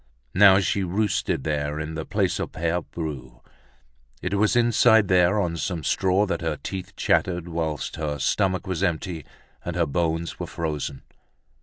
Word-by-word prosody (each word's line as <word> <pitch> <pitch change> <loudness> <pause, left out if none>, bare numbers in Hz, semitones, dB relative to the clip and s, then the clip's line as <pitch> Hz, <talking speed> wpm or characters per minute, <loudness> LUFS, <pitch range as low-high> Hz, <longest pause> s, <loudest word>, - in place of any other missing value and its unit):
Now 95 0 +7
she 100 0 0
roosted 95 -4 0
there 75 0 -2
in 80 +1 -4
the 80 0 -5
place - - 0
of - - -4
Pere 85 +2 -1
Bru. 65 -9 -7 0.8
It 90 - -2
was 105 +2 +2
inside 115 -3 +4
there, 90 +3 +4
on 85 -4 -1
some 85 0 -3
straw, 95 +6 +2
that 95 - -2
her 80 -2 -2
teeth 95 0 -6
chattered, 90 -2 +1
whilst 80 -3 -3
her 75 -2 -2
stomach 95 +6 0
was 95 -2 -3
empty 85 -3 -2 0.4
and - - -4
her - - +2
bones 80 +2 -2
were - - -4
frozen. 75 -4 -4
85 Hz, 160 wpm, -24 LUFS, 80-95 Hz, 0.8 s, Now